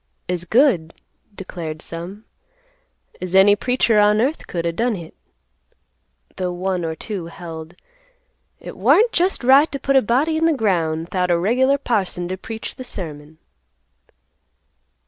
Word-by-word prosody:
"As 180 -1 -2
good," 185 - +2 0.4
declared 165 -5 -6
some, 175 +7 -7 1.0
"as 185 0 -3
any 200 +2 +7
preacher 235 0 +2
on 210 +1 +4
earth 275 +7 -1
could 170 -1 -3
o' 170 - +1
done 230 +6 0
hit;" 170 -4 -9 1.2
though 180 -1 -2
one 180 0 -2
or 160 -1 -3
two 190 -2 -6
held 165 -1 -9 0.8
"it - - -9
warn't 460 +2 +4
jest 365 - +1
right 275 +5 +5
to 275 - -3
put 275 +1 0
a 265 - +7
body 275 +9 +1
in 325 +1 +3
th' 300 - -1
ground 165 -6 0
'thout 180 -1 0
a 175 - +3
regular 255 +9 +2
parson 195 -9 -2
t' 185 - -3
preach 220 +4 -7
th' 255 - -6
sermon." 155 -8 -7
190 Hz, 145 wpm, -20 LUFS, 170-250 Hz, 1.2 s, any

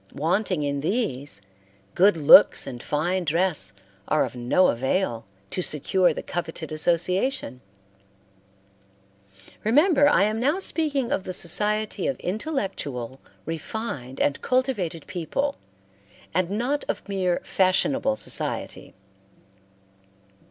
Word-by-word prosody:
Wanting 170 +2 0
in 140 -1 -2
these, 145 - -2 0.5
good 190 -1 +4
looks 145 -3 +7
and 125 -3 -7
fine 175 +7 -1
dress 165 - +1 0.4
are 155 - +2
of - - -8
no 125 +10 +3
avail 120 -1 -1 0.3
to 185 - -2
secure 175 +3 +2
the - - -5
coveted 165 -2 -5
association. 175 - 0 2.0
Remember 290 - +4
I 285 - +4
am 215 +2 0
now 285 +8 +1
speaking 290 -9 -1
of 195 - 0
the 185 - -5
society 210 +5 0
of 275 - -2
intellectual, 180 - -4 0.3
refined, 160 - -5
and 145 - 0
cultivated 220 - -1
people, 190 - -3 0.7
and 180 +1 +1
not 245 +8 -1
of - - -3
mere 185 -3 0
fashionable 270 +9 +1
society. - - -4
185 Hz, 110 wpm, -24 LUFS, 150-225 Hz, 2.0 s, looks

